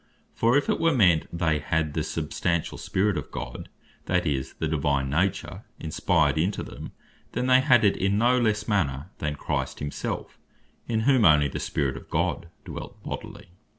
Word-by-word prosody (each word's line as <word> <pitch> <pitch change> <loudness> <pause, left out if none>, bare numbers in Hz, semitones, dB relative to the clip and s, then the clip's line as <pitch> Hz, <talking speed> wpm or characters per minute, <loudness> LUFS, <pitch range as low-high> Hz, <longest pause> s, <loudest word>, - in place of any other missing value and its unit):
For 120 +4 +3
if 145 - 0
it - - +1
were 165 -2 +3
meant 90 -9 +4
they 80 -3 +1
had 75 +1 -1
the - - -1
substantial 85 -2 -2
Spirit 95 -3 0
of 70 - -9
God; - - -7 0.4
that - - +1
is, 65 -2 -1
the 80 - -2
Divine 70 -3 0
nature, 90 +6 -1 0.2
inspired 80 0 +1
into 95 +6 0
them, - - -9 0.4
then 125 +2 -1
they 130 0 +5
had 120 -3 +5
it 100 - +3
in 100 +1 +1
no 125 +3 +4
lesse 110 -3 0
manner 75 -5 0
than 75 -1 -2
Christ - - -3
himself, 75 0 -5 0.5
in 110 -1 0
whom 130 +1 +4
onely 75 -7 +5
the - - -5
Spirit 70 -2 -1
of - - -12
God 85 - -1 0.2
dwelt - - -8
bodily. - - -7
85 Hz, 175 wpm, -26 LUFS, 75-110 Hz, 0.5 s, they